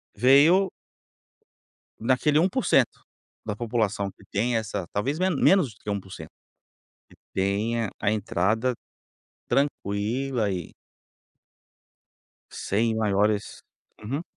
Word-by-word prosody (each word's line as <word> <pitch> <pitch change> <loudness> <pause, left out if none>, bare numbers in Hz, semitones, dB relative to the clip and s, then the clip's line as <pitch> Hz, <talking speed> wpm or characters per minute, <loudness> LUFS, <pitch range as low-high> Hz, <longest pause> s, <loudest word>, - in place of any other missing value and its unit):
veio 145 - +5 1.3
naquele 130 +6 +2
1% 180 - +2 0.4
da 105 - -3
população 110 -4 -1
que 100 - -20
tem 115 +4 0
essa 100 -5 -3
talvez 135 +9 -1
me 185 +1 +2
menos 175 -1 +3
do - - -28
que 105 - -5
1% 100 -2 -6 0.8
que - - -19 0.2
tem 105 +4 0
a 100 - +1
entrada 110 +4 0 0.7
tranquila, 120 -2 -1
e 90 -3 -5 1.8
sem 110 +3 -1
maiores 105 0 0 0.4
uhum. 135 +9 -3
110 Hz, 95 wpm, -25 LUFS, 100-135 Hz, 1.8 s, veio